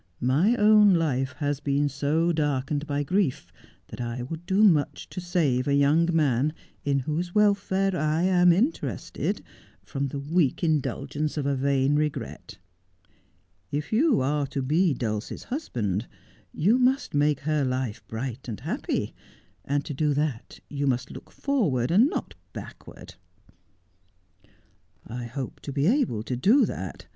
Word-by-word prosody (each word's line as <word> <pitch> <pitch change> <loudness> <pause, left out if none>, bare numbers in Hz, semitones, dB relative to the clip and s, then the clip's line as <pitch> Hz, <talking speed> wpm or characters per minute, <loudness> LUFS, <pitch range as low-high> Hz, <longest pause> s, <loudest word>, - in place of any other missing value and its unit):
My 150 - +3
own 210 -3 +6
life 135 -5 0
has 145 -2 -2
been 145 0 +1
so 145 +5 +1
darkened 145 -1 -1
by 145 0 -1
grief 145 - -1 0.4
that - - -7
I 120 +1 -4
would 165 +6 -7
do 195 +3 +3
much 160 -9 +2
to 180 - -5
save 155 -8 0
a 140 - +3
young 150 +4 +3
man, 150 -3 +2 0.3
in 140 -1 +1
whose 170 +7 -3
welfare 195 -2 +2
I 155 +1 0
am 180 -1 +5
interested, 235 - -1 0.4
from 140 -1 -3
the 140 - -5
weak 150 +2 0
indulgence 150 -1 -1
of 145 - -1
a 140 0 +1
vain 135 +1 +1
regret. 135 -7 -4 1.1
If 150 +6 -3
you 265 - +3
are 145 +2 0
to 135 0 -3
be 155 +3 +2
Dulcie's 110 -3 -4
hus 290 +5 -5
band 105 -2 -2 0.4
you 210 - +2
must 260 +2 +1
make 145 -1 +2
her 150 0 0
life 130 -4 -2
bright 125 +3 -5
and 110 -5 -5
happy, - - -2 0.5
and 145 0 -1
to 155 - -5
do 150 +1 0
that 145 -5 -3
you 140 -1 -2
must 125 0 -1
look - - -11
forward, 165 - 0
and 220 - +5
not - - -4 0.2
backward.' - - -10 1.0
' 90 -1 -42 0.6
I 120 +2 -6
hope 130 +2 -6
to 140 - -7
be 140 +1 0
able 210 - +1
to 125 - -3
do 210 - +4
that. - - -6
145 Hz, 150 wpm, -26 LUFS, 130-175 Hz, 1.1 s, own